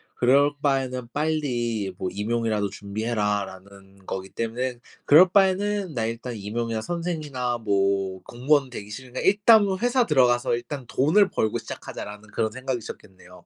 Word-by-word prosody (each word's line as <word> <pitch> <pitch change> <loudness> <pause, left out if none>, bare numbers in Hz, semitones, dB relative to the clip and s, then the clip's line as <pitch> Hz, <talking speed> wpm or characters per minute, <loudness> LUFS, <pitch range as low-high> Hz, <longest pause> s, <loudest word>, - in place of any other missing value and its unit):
그럴 140 +4 +4
바에는 130 -4 -1
빨리 120 -10 -1
뭐 95 - -2
임용이라도 110 -1 -1
준비해라."라는 100 -2 -4
거기 95 0 -5
때문에 120 +3 -3 0.3
그럴 175 +6 +7
바에는 195 -1 +2
나 115 -4 -1
일단 115 +2 -4
임용이나 110 +2 -3
선생이나 150 -7 -3
뭐 100 -3 0
공무원 130 +2 +1
되기 105 -4 -8
싫으니까 125 +3 -7
'일단은 205 -1 +5
회사 245 +1 +2
들어가서 125 -4 +3
일단 120 +3 -6
돈을 155 - +3
벌고 110 - -1
시작하자.'라는 105 +1 -8
그런 110 -1 -1
생각이셨겠네요. 105 -8 -7
120 Hz, 355 characters per minute, -25 LUFS, 105-145 Hz, 0.3 s, 그럴